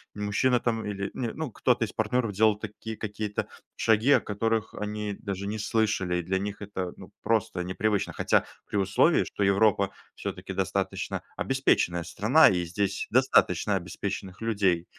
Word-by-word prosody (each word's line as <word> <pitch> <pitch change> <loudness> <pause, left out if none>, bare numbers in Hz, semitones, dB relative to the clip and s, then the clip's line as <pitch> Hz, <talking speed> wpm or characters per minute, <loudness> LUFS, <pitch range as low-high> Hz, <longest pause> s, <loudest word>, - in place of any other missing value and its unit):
мужчина 105 +5 +1
там 115 -2 -1
или, 100 -1 -3
не 120 -3 -2
ну, 155 -6 -4
кто-то 125 0 +1
из - - -8
партнеров 110 0 0
делал 105 +1 +3
такие 110 +1 -7
какие-то 105 -1 -3 0.3
шаги, 110 +5 +3
о - - +7
которых 110 +2 -1
они 105 -1 -3
даже 100 -1 -4
не 110 +1 -3
слышали. 95 -5 0
Для 95 +3 -1
них 100 +1 -5
это, 95 -3 -4
ну, - - -11
просто 105 -5 0
непривычно. 100 +3 -1
Хотя - - +2 0.2
при 105 - -2
условии, 95 0 +3
что 100 - -3
Европа 100 0 +3 0.2
всё-таки - - -5
достаточно - - -2
обеспеченная 90 -10 +1
страна - - +5
и 90 -2 0
здесь 100 +3 -2
достаточно 105 -6 +3
обеспеченных 95 +2 -5
людей. 100 -6 +1
105 Hz, 150 wpm, -27 LUFS, 95-110 Hz, 0.3 s, о